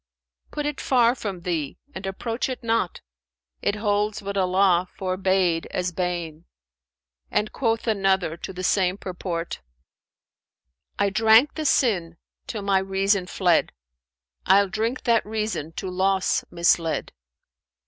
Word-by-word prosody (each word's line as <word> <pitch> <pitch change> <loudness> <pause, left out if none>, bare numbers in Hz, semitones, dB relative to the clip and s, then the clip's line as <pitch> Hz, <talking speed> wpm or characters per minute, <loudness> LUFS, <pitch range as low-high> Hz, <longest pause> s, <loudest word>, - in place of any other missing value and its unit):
Put 295 -1 -4
it 295 -1 -3
far 240 -2 +4
from 200 -8 -5
thee 165 -5 -3 0.2
and 190 0 -6
approach 230 +6 -3
it 255 -1 -5
not; 225 -5 0 0.3
* 60 0 -56
It 205 - 0
holds 210 0 0
what 200 0 -4
Allah 185 -1 +3
forbade 185 -2 +1
as 180 0 -2
bane.' 175 -2 -3 0.8
And 215 - 0
quoth 225 -3 -1
another 195 -6 +1
to 180 - -7
the 185 0 -7
same 185 0 +2
purport, 175 -3 -5 1.4
'I 200 -1 +1
drank 225 +6 +5
the 315 - -4
sin 180 - +1 0.3
till 210 -3 -4
my 195 -1 +3
reason 195 0 +1
fled: 180 -2 +2 0.4
* - - -22
Ill 200 0 +5
drink 225 +5 -2
that 230 -2 +3
reason 215 -7 -3
to 190 - -5
loss 190 +1 +1
misled!' 170 -1 +1
190 Hz, 135 wpm, -24 LUFS, 175-215 Hz, 1.4 s, drank